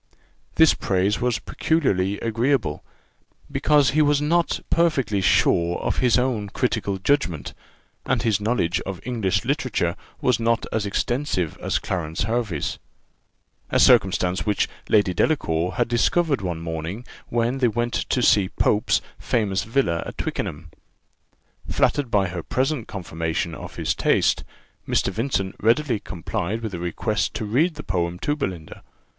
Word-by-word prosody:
This - - +6
praise 95 +2 0
was 125 -2 +1
peculiarly 100 - 0
agreeable, 115 - 0 0.7
because 145 -3 +3
he 155 +3 +3
was 145 -1 +3
not 165 +3 +1
perfectly 135 - +2
sure 85 -1 +3
of - - -2
his 125 -2 +4
own 120 -5 0
critical 105 -4 -1
judgment, 95 - 0 0.5
and - - 0
his 105 -3 +1
knowledge 105 -6 0
of 95 -2 -5
English 100 -7 0
literature 125 - 0 0.2
was 125 -3 +2
not 115 0 +1
as 110 -2 -1
extensive 105 - -1
as - - 0
Clarence 80 -2 -3
Hervey's; 110 -8 -2 0.9
a - - +2
circumstance 90 -1 +4
which 105 -2 +1 0.2
Lady 100 -3 +3
Delacour 90 - 0
had 120 - 0
discovered 140 - +1
one 85 -3 -3
morning, 85 +7 -5 0.2
when 120 +3 0
they 125 - +4
went 120 +1 -1
to 125 - 0
see 100 -5 +4
Pope's 105 +1 +1 0.2
famous 105 -5 0
villa 110 -8 0
at - - -8
Twickenham. - - -4 1.0
Flattered 145 -4 +1
by 100 -3 +2
her 85 -1 -4
present 130 - -1
confirmation 85 -2 -3
of - - -9
his - - 0
taste, - - +2 0.4
Mr. - - +1
Vincent 100 -3 -2
readily 115 +1 +2
complied 100 +3 -4
with 110 -3 -4
a 85 - -4
request 100 +5 -1
to 110 - -3
read 150 +11 +1
the 150 - -7
poem 90 -2 -1
to 145 +10 -1
Belinda. 90 - -5
110 Hz, 140 wpm, -23 LUFS, 90-125 Hz, 1.0 s, This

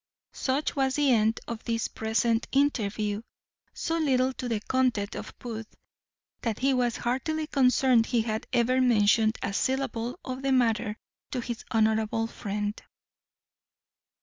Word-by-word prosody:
Such 275 +3 -1
was 265 -2 +1
the 290 -2 +3
end 220 0 +2
of 230 -2 -5
this 230 -1 -1
present 225 +1 0
interview, 215 -7 +1 0.5
so 330 0 -2
little 260 -4 +2
to 250 -1 -5
the 225 -2 0
content 235 -3 0
of - - -8
Booth, 225 -3 -7 0.7
that 225 -3 -1
he 270 +1 +2
was 245 -2 +1
heartily 305 +6 -1
concerned 255 -4 +3
he 235 -3 +1
had 220 -1 -3
ever 250 +1 +3
mentioned 220 -2 +4
a 195 - -2
syllable 250 0 -1
of 255 0 -4
the 275 0 0
matter 225 -3 +1 0.4
to 255 - -1
his 235 -1 -5
honourable 220 0 +2
friend. 205 -1 -4
235 Hz, 140 wpm, -28 LUFS, 220-260 Hz, 0.7 s, mentioned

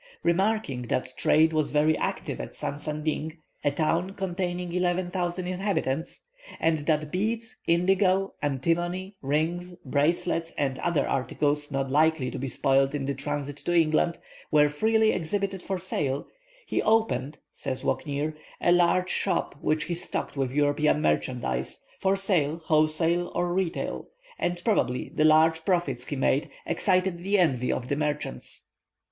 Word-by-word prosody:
Remarking 185 - +1
that 130 +1 -1
trade 160 +1 +4
was 155 -1 +1
very 150 +1 +3
active - - -3
at - - -8
Sansanding, 155 +2 -3 0.3
a 145 - +3
town 165 +6 0
containing 180 -2 -3
eleven 180 0 0
thousand 175 0 -2
inhabitants, 180 - -2 0.3
and 160 -1 +2
that 155 -2 +1
beads, 225 +5 -2
indigo, 190 +3 +3
antimony, 175 +7 -1
rings, 165 +6 -1
bracelets, 165 +4 0
and 135 -2 -1
other 150 -5 +1
articles 145 +2 0
not 135 -2 -2
likely 155 -2 +3
to - - -5
be 135 - -3
spoiled 135 +2 +2
in 140 -2 -2
the 140 - -1
transit 145 +1 -4
to 175 +4 -2
England, 165 +1 +3 0.3
were 150 -1 +5
freely 220 +8 +3
exhibited 195 +2 -2
for 190 +1 -3
sale, 145 -6 -2 0.4
"he - - 0
opened," 155 - +1 0.2
says 130 -2 -4
Walcknaer, 150 0 -1 0.3
"a 175 - +3
large 180 +1 +3
shop, - - 0
which 155 0 +1
he 175 - -3
stocked 170 - -3
with 135 -2 0
European 150 +1 +2
merchandise, 120 - -1 0.2
for 195 0 +2
sale 170 -6 +1
wholesale 160 +3 +2
and 175 0 0
retail; 185 -3 -2 0.3
and 175 0 -1
probably 130 - +1
the 155 - +2
large 160 +1 +5
profits 150 -10 0
he 145 - -3
made 135 +2 +1 0.2
excited 185 -2 +1
the 195 +4 +1
envy 130 -9 +2
of 125 - -3
the 140 - 0
merchants. 150 0 -3
160 Hz, 145 wpm, -27 LUFS, 145-180 Hz, 0.4 s, were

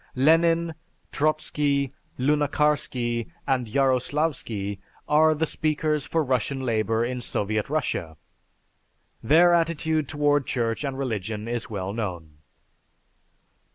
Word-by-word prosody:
Lenin, 165 +4 +3 0.4
Trotzky, 145 -2 0 0.2
Lunacharsky, 140 -4 +1 0.2
and 130 -3 0
Yaroslavsky, 130 -5 0 0.3
are 155 +1 +4
the 160 +2 +1
speakers 155 -2 -1
for 165 -1 +1
Russian 135 0 -1
Labor 115 -2 0
in 125 0 -3
Soviet 105 -1 -2
Russia. 105 - -2 1.0
Their 170 +8 +5
attitude 160 -2 +1
toward 145 -2 +1
Church 115 0 -1
and 135 -2 -3
Religion 110 -4 -3
is 120 -1 -3
well 100 -2 -4
known.... 85 -9 -5
135 Hz, 100 wpm, -25 LUFS, 115-150 Hz, 1.0 s, Their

